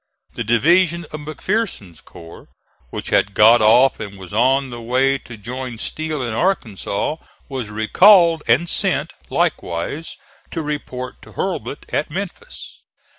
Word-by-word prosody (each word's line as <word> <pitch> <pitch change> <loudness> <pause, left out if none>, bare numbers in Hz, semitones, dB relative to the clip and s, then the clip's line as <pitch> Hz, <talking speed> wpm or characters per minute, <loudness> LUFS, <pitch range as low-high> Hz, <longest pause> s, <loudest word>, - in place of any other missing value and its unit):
The - - -3
division 170 - +3
of 155 - -6
McPherson's 155 - -3
corps, 80 0 -13 0.4
which - - -6
had 100 - +2
got 115 +2 +7
off 120 +5 +5
and 100 -2 -7
was 95 +1 -11
on 130 +4 +2
the 120 -1 -7
way 130 +3 +1
to 115 -3 -11
join 125 +3 -6
Steele 155 +3 -3
in 120 -2 -3
Arkansas, 120 - -1 0.3
was 130 -6 -5
recalled 165 - +5
and 130 +9 +3
sent, - - 0 0.2
likewise, 90 - -2 0.3
to 165 - -4
report 130 -4 -5
to - - -15
Hurlbut - - -4
at - - 0
Memphis. - - -7
130 Hz, 135 wpm, -20 LUFS, 110-155 Hz, 0.4 s, got